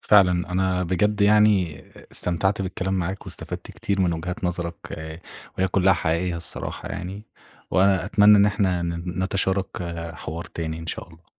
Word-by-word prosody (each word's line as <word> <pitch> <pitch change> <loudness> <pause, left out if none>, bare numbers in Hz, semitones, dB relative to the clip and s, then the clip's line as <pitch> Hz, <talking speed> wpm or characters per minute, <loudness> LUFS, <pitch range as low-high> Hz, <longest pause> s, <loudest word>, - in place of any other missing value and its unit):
فعلًا 90 -3 +4
أنا 95 0 +1
بجد 100 +4 +1
يعني 100 -7 +4 0.3
استمتعت 95 +4 +2
بالكلام 95 0 -2
معاك، 95 +1 -3
واستفدت - - -5
كتير 100 -1 -2
من 90 -2 +2
وجهات 90 +3 -4
نظرك، 85 -1 -2 0.2
آآ 80 +1 -7 0.4
وهي 95 +1 +2
كلها 95 +1 +4
حقيقية 85 +1 0
الصراحة 85 -2 -5
يعني، 95 +4 -6 0.5
وأنا 95 -1 +3
أتمنى 105 +2 +6
إن 100 0 +6
إحنا 95 -4 +1
ن 85 +1 -3
نتشارك 95 0 0 0.5
حوار 80 +2 -6
تاني 80 -1 -5
إن 80 - -8
شاء - - -5
الله. 85 0 -19
90 Hz, 155 wpm, -24 LUFS, 85-95 Hz, 0.5 s, أتمنى